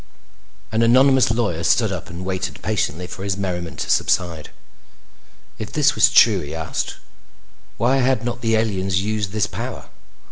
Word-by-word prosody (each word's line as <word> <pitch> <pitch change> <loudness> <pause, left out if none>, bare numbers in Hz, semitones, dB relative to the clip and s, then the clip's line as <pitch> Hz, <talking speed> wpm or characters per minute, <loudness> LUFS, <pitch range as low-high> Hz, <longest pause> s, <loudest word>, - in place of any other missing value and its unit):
An 110 +1 +1
anonymous 130 +2 +5
lawyer 110 -8 -1
stood 110 +4 +2
up 90 -4 -6
and 85 +2 -7
waited 95 -1 -3
patiently 90 -5 -2
for 95 +2 -8
his 100 -1 -2
merriment 90 -4 -4
to - - -4
subside. 85 -3 0 1.1
If 110 - -6
this 150 -1 +3
was - - +5
true, 105 -5 +5
he 75 -1 -7
asked, 80 -1 -3 0.8
why 125 +3 +2
had 130 -3 +1
not 120 0 -4
the 115 -1 +1
aliens 95 -4 0
used 105 -1 -2
this 105 0 0
power? - - -7
100 Hz, 155 wpm, -21 LUFS, 90-115 Hz, 1.1 s, anonymous